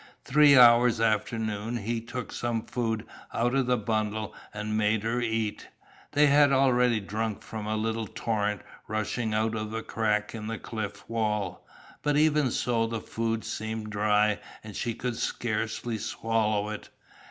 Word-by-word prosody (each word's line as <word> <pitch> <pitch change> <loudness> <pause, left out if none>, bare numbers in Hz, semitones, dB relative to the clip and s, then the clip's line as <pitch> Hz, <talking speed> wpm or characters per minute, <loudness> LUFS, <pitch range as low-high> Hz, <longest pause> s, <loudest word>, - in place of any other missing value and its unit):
Three 145 0 +6
hours 120 -1 +7
after 110 0 +1
noon 110 +1 -2
he 115 +1 -2
took 120 +2 -6
some 120 -2 -2
food 115 -3 -2 0.3
out 120 +2 +1
of 135 -2 +2
the 125 0 +3
bundle 110 0 -2 0.2
and 105 0 -3
made 105 0 +2
her 115 +2 0
eat. 110 -2 -2 0.5
They 150 +1 +5
had 145 0 +5
already 125 -3 +4
drunk 105 +1 -3
from 110 -2 -6
a 110 - 0
little 110 0 -1
torrent 105 -3 -2 0.2
rushing 110 +1 -2
out 110 +1 +1
of 110 0 -4
a 115 - -3
crack 105 -2 0
in 110 -2 -5
the 115 0 -3
cliff 100 -3 -6
wall, 105 -5 -2 0.3
but 145 -1 +1
even 150 -3 +3
so 115 -1 0
the 115 0 -3
food 115 0 -2
seemed 110 0 -4
dry 105 0 +2 0.2
and 105 -2 -9
she 115 -2 -2
could 125 -2 -3
scarcely 110 0 -2
swallow 110 -1 0
it. 105 - -7
110 Hz, 160 wpm, -28 LUFS, 105-120 Hz, 0.5 s, hours